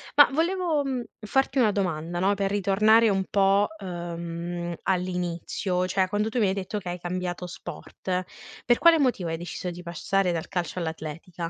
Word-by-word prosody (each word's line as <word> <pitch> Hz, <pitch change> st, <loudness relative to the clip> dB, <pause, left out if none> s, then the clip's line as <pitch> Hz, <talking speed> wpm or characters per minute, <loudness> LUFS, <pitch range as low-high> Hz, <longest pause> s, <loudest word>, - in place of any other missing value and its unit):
Ma 290 Hz, -1 st, +9 dB
volevo, 335 Hz, -1 st, +1 dB
mhmm, 260 Hz, -3 st, -2 dB, 0.2 s
farti 270 Hz, +5 st, +1 dB
una 220 Hz, -4 st, +5 dB
domanda, 175 Hz, -3 st, -2 dB
no, 195 Hz, +2 st, +3 dB
per 195 Hz, -1 st, 0 dB
ritornare 210 Hz, +3 st, +4 dB
un 190 Hz, -1 st, +1 dB
po', 200 Hz, +1 st, +3 dB
ehm, 170 Hz, -1 st, -5 dB
all'inizio, 180 Hz, 0 st, -1 dB
cioè 190 Hz, 0 st, +1 dB
quando 210 Hz, +2 st, 0 dB
tu 245 Hz, -, -1 dB
mi 210 Hz, -, +4 dB
hai 190 Hz, -, +1 dB
detto 195 Hz, +2 st, -3 dB
che 180 Hz, -, -6 dB
hai 175 Hz, 0 st, -4 dB
cambiato 180 Hz, 0 st, -3 dB
sport, 185 Hz, 0 st, -5 dB, 0.4 s
per 240 Hz, 0 st, +4 dB
quale 335 Hz, -2 st, +6 dB
motivo 240 Hz, -, +1 dB
hai 165 Hz, -, -2 dB
deciso 175 Hz, +1 st, -5 dB
di 175 Hz, 0 st, -7 dB
passare 185 Hz, +2 st, 0 dB
dal 165 Hz, -, -3 dB
calcio 180 Hz, -1 st, -2 dB
all'atletica? 165 Hz, +1 st, -5 dB
185 Hz, 170 wpm, -26 LUFS, 175-210 Hz, 0.4 s, Ma